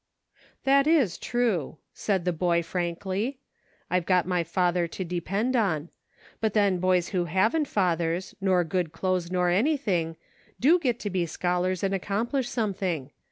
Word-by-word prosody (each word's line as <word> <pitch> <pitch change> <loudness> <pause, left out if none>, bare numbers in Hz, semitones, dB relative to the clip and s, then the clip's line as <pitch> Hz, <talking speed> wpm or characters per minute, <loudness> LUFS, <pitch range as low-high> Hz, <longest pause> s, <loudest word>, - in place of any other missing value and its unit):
"That 275 +1 +4
is 285 - +3
true," 220 - -1 0.2
said 190 -4 -1
the 180 - +1
boy, 170 0 +1
frankly; 185 +8 -2 0.5
"I've 180 -2 0
got 180 -2 +3
my 180 -1 0
father 175 +1 +1
to 185 +3 -5
depend 195 +8 -1
on; 175 -9 0 0.5
but 220 -2 -1
then 200 -4 +3
boys 180 -1 +2
who 180 -3 0
haven't 220 - +1
fathers, 175 -3 0
nor 185 -2 +3
good 165 -1 -2
clothes 180 0 -1
nor 180 -1 +1
anything, 195 - +1 0.4
do 320 +8 +5
get 245 -7 0
to 205 - -3
be 175 -2 0
scholars 180 +2 -1
and 195 0 +1
accomplish 230 +7 -1
something. 185 - -2
185 Hz, 150 wpm, -27 LUFS, 175-215 Hz, 0.5 s, do